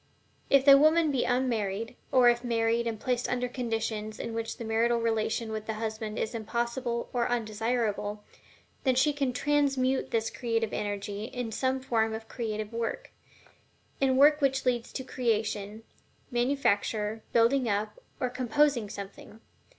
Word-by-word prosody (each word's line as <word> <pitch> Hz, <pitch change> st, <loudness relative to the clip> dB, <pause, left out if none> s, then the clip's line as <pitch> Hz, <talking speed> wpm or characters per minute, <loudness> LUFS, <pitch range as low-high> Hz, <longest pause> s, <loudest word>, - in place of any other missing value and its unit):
If 275 Hz, -1 st, +5 dB
the 275 Hz, -1 st, +9 dB
woman 310 Hz, +1 st, +4 dB
be 265 Hz, -3 st, 0 dB
unmarried, 230 Hz, -3 st, -1 dB, 0.2 s
or 255 Hz, -2 st, +6 dB
if 240 Hz, 0 st, +3 dB
married 230 Hz, 0 st, +1 dB
and 225 Hz, -2 st, -3 dB
placed 250 Hz, 0 st, -1 dB
under 245 Hz, 0 st, 0 dB
conditions 225 Hz, -3 st, -3 dB
in 230 Hz, -, -4 dB
which 225 Hz, 0 st, -4 dB
the 230 Hz, -, -6 dB
marital 230 Hz, +2 st, +2 dB
relation 225 Hz, 0 st, -1 dB
with 215 Hz, 0 st, -5 dB
the 220 Hz, -, -2 dB
husband 220 Hz, 0 st, -4 dB
is 220 Hz, -, -2 dB
impossible 235 Hz, +2 st, -2 dB
or 240 Hz, -1 st, +1 dB
undesirable, 215 Hz, -2 st, -1 dB, 0.6 s
then 260 Hz, -2 st, +3 dB
she 290 Hz, +4 st, +3 dB
can 275 Hz, -3 st, 0 dB
TRANSMUTE 270 Hz, -1 st, +1 dB
this 225 Hz, -1 st, 0 dB
creative 230 Hz, -2 st, -1 dB
energy 205 Hz, 0 st, -3 dB
in 245 Hz, -1 st, -5 dB
some 260 Hz, +3 st, 0 dB
form 225 Hz, -3 st, 0 dB
of 220 Hz, 0 st, -8 dB
creative 215 Hz, -2 st, -4 dB
work 230 Hz, 0 st, -3 dB, 0.9 s
in 265 Hz, -1 st, +2 dB
work 295 Hz, +2 st, +6 dB
which 270 Hz, -1 st, +1 dB
leads 240 Hz, -2 st, 0 dB
to 260 Hz, -, -4 dB
the 260 Hz, -, -16 dB
creation, 215 Hz, -3 st, -1 dB, 0.5 s
manufacture, 225 Hz, -4 st, 0 dB
building 235 Hz, +2 st, +3 dB
up, 210 Hz, -, -2 dB, 0.2 s
or 250 Hz, -3 st, -1 dB
composing 250 Hz, -2 st, +1 dB
something. 200 Hz, +2 st, -9 dB
235 Hz, 150 wpm, -29 LUFS, 220-255 Hz, 0.9 s, the